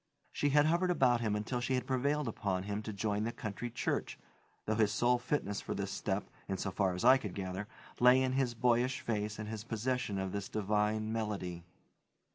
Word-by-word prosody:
She 145 - +1
had 145 +1 +5
hovered 170 +3 +2
about 125 -8 +3
him 110 -2 0
until 115 +4 -2
she 130 +2 0
had 125 - -1
prevailed 140 +2 0
upon 95 -4 -1
him 105 +1 -3
to 110 - -5
join 105 +1 -1
the 115 - -1
country 115 +1 -5
church, 115 - -2 0.5
though 110 - +1
his 105 -1 +3
sole 120 +3 +3
fitness 120 -5 -1
for - - -4
this - - -3
step, - - -2 0.2
insofar 95 -1 0
as 90 - -2
I 130 +2 +8
could 105 -7 -6
gather, 95 +1 -4 0.3
lay 125 +1 +7
in 130 -1 +1
his 130 -2 0
boyish 125 +2 +2
face 105 -2 -2
and 105 0 -5
his 110 -1 -5
possession 120 -1 -1
of 95 -1 -2
this 100 0 -4
divine 105 +1 0
melody. 100 -6 -3
110 Hz, 195 wpm, -33 LUFS, 105-125 Hz, 0.5 s, I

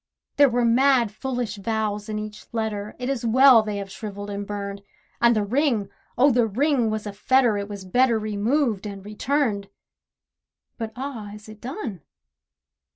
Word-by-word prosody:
There 285 -1 +7
were 240 0 +1
mad 245 -1 +4
foolish 245 -2 -3
vows 210 0 -2
in 215 - -2
each 215 0 -7
letter, 215 -2 -3
It 250 - -4
is 270 -3 -2
well 250 +1 +7
they 210 -1 -4
have 195 -1 -6
shrivelled 205 -1 -7
and 200 0 -5
burned, 200 -1 -5 0.4
And 235 0 +5
the 215 - +1
ring! 235 -2 +1 0.3
oh, 275 +3 +5
the 240 -2 +3
ring 255 +1 +1
was 215 0 -3
a 205 - -5
fetter, 245 +2 +3
It 200 0 -4
was 200 -2 -7
better 240 +4 +3
removed 215 +1 0
and 200 -1 -8
returned. 215 -2 -1 1.1
But 225 -1 -4
ah, 245 -6 -6
is 210 0 -13
it 215 -1 -12
done? 245 - -5
220 Hz, 165 wpm, -24 LUFS, 205-250 Hz, 1.1 s, There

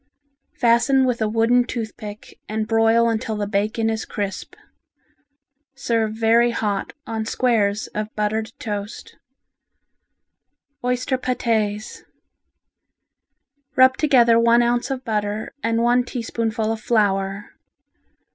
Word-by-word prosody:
Fasten 255 +3 +3
with 245 -2 -1
a 215 - +1
wooden 230 +3 +3
tooth 230 -3 -5
pick 210 0 -10
and 215 0 -2
broil 225 +1 +3
until 225 0 -1
the 210 -1 -2
bacon 215 +2 -1
is 220 0 -1
crisp. 200 -2 -5 1.2
Serve 230 -5 0
very 230 +2 +3
hot 210 -4 -2
on 225 -1 -3
squares 220 -3 +1
of 215 0 -4
buttered 215 +1 -1
toast. 205 -1 -6 1.7
Oyster 250 +1 -1
Patés 220 -4 -1 1.7
Rub 260 0 +6
together 240 -6 +4
one 235 +1 +4
ounce 240 +2 0
of 265 -1 -4
butter 210 -1 -2
and 230 0 0
one 245 +1 +3
teaspoonful 225 -2 -2
of 225 -1 -4
flour. 200 -3 0
225 Hz, 110 wpm, -22 LUFS, 215-240 Hz, 1.7 s, Rub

